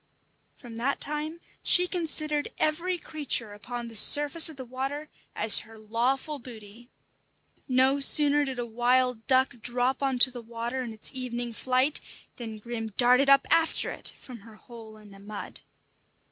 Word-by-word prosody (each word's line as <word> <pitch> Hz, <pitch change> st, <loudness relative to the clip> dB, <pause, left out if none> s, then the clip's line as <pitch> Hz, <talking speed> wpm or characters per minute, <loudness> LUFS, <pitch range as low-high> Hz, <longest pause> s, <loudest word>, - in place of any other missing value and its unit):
From 235 Hz, -3 st, -12 dB
that 260 Hz, +4 st, -2 dB
time 300 Hz, +3 st, -3 dB, 0.2 s
she 360 Hz, -, +5 dB
considered 310 Hz, -4 st, -1 dB
every 340 Hz, +4 st, -1 dB
creature 285 Hz, -10 st, -2 dB
upon 235 Hz, +3 st, -7 dB
the 230 Hz, -, -11 dB
surface 295 Hz, +8 st, +5 dB
of 310 Hz, -, -12 dB
the 260 Hz, -, -8 dB
water 270 Hz, +5 st, -5 dB, 0.3 s
as 215 Hz, 0 st, +5 dB
her 225 Hz, +1 st, -12 dB
lawful 250 Hz, +7 st, -2 dB
booty. 230 Hz, -1 st, -13 dB, 0.8 s
No 265 Hz, +1 st, +3 dB
sooner 290 Hz, +1 st, +4 dB
did 265 Hz, -2 st, -5 dB
a 240 Hz, -, -3 dB
wild 245 Hz, 0 st, 0 dB
duck 260 Hz, 0 st, +2 dB
drop 245 Hz, +3 st, -1 dB
on 270 Hz, -2 st, -1 dB
to 255 Hz, +1 st, +6 dB
the 245 Hz, -1 st, -9 dB
water 235 Hz, +3 st, -5 dB
in 235 Hz, -, -7 dB
its 220 Hz, -1 st, 0 dB
evening 245 Hz, -2 st, -4 dB
flight, 255 Hz, +5 st, 0 dB, 0.4 s
than 225 Hz, -3 st, -7 dB
Grim 225 Hz, -1 st, -7 dB
darted 250 Hz, +3 st, +4 dB
up 275 Hz, 0 st, +5 dB
after 325 Hz, -1 st, +2 dB
it -, -, -2 dB
from 250 Hz, -3 st, -12 dB
her 215 Hz, +2 st, -16 dB
hole 220 Hz, -1 st, -14 dB
in 210 Hz, -1 st, -16 dB
the 195 Hz, -, -15 dB
mud. 205 Hz, +1 st, -9 dB
250 Hz, 160 wpm, -26 LUFS, 230-280 Hz, 0.8 s, to